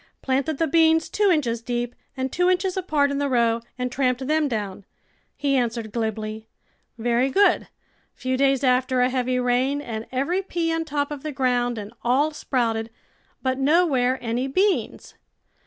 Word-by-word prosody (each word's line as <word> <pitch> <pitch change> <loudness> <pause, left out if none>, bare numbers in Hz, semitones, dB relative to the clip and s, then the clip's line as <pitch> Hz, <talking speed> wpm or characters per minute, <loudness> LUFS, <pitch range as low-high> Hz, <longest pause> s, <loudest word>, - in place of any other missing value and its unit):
Planted 275 +3 0
the 325 - +2
beans 320 0 +3
two 415 -1 +2
inches 245 -9 +1
deep 240 0 -3 0.2
and 260 0 -2
two 360 0 +2
inches 370 0 +1
apart 305 -7 +1
in 280 - -1
the 285 -1 0
row 235 -2 +2 0.2
and 250 0 -2
tramped 255 0 0
them 305 +1 +2
down," 205 -5 -4 0.5
he 280 -1 +1
answered 230 -3 -1
glibly. 220 -1 -3 0.5
Very 240 +3 +1
good! 390 +5 +4
A - - -16 0.5
few 255 0 -2
days 275 0 +2
after 255 0 +2
a 250 - +3
heavy 255 0 0
rain 250 +3 +1
and 225 -5 -6
every 280 +9 0
pea 340 -3 -2
on 325 0 -1
top 285 -1 -2
of 290 -2 -5
the 305 - -4
ground, 245 -3 0
and 210 +1 -7
all 270 +7 +2
sprouted, 230 -7 -1 0.5
but 260 0 0
nowhere 270 -4 +3
any 240 +3 -1
beans. 380 +8 0
260 Hz, 170 wpm, -24 LUFS, 240-300 Hz, 0.5 s, good